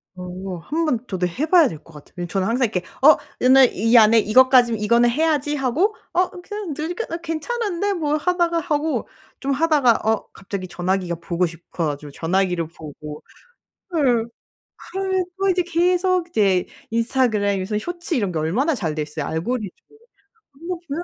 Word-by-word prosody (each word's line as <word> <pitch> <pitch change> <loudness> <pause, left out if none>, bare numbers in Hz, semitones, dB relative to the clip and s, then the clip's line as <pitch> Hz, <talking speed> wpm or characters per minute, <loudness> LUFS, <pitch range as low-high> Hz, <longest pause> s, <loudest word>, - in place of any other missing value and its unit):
어 180 0 -6
한번 295 - -1
저도 185 -3 -1
해 245 - -2
봐야 330 -2 +5
될 160 - -6
것 165 - -18
같아요. 150 -1 -15
왜 175 - -3
저는 190 +2 -1
항상 245 +3 +2
이렇게 205 -5 -2 0.2
'어 305 +2 +8 0.2
이날 260 0 +6
이 230 +4 +3
안에 225 0 +7
이것까지 245 +2 +5
이거는 235 +3 +3
해야지.' 295 +2 +1
하고 295 - +1 0.2
'어 365 +1 +2
그냥 415 -3 -6
느리게 350 +9 -3
나 330 - -4
괜찮은데.' 395 +4 -2
뭐 305 -5 -1
하다가 340 +1 +1
하고 310 -1 -1 0.3
좀 275 - -2
하다가 290 -3 +3 0.2
어 220 - 0
갑자기 195 -1 -6
전화기가 180 0 -2
보고 170 +1 -1
싶어 170 0 -5
가지고 145 0 -5
전화기를 180 +1 0
보고 150 -2 -10 0.8
예. 245 -7 +3 0.7
헐 380 0 0
그리고 390 0 0
이제 365 -1 +2
계속 355 +1 +1
이제 195 - +2 0.2
인스타그램에서 215 -4 0
쇼츠 345 - -4
이런 205 -9 0
게 165 - -2
얼마나 230 - +1
잘 165 - -3
돼 155 - -3
있어요 150 0 -5
알고리즘. 205 +6 -2 0.8
그런 310 +5 -12
거 360 -1 -3
보면 305 +4 -3
245 Hz, 345 characters per minute, -21 LUFS, -, 0.8 s, 어